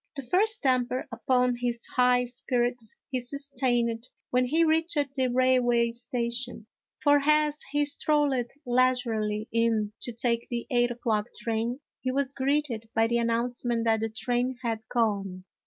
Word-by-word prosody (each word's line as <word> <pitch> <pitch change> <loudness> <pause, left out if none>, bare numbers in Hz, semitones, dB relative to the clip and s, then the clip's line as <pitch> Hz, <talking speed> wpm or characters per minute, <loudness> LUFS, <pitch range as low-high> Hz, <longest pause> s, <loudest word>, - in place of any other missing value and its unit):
The 275 - -5
first 400 - +1
damper 255 -1 +1
upon 250 +1 +1
his 240 -1 -2
high 250 0 +4
spirits 245 -2 -2 0.2
he 255 - 0
sus 280 +3 -1
tained 235 -2 +1 0.3
when 250 0 +3
he 315 +6 +2
reached 325 +1 +2 0.2
the 260 -2 +1
railway 245 -2 +3
station, 240 -1 -3 0.4
for 290 0 +5
as 300 0 +2
he 290 0 +2
strolled 295 0 +2 0.3
leisurely 240 -4 +1
in 225 -2 +1
to 240 - -5
take 235 0 -1
the 235 -1 -3
eight 240 -1 +3
o'clock 230 -3 -1
train, 230 +4 -2 0.2
he 260 - -3
was 275 +1 -1
greeted 270 -5 -1
by 225 0 +4
the 235 +1 +1
announcement 235 0 -1
that 225 -1 +3
the 225 +1 -2
train 245 +3 -1
had 225 -2 -1
gone. 200 -6 -1
245 Hz, 150 wpm, -27 LUFS, 230-260 Hz, 0.4 s, for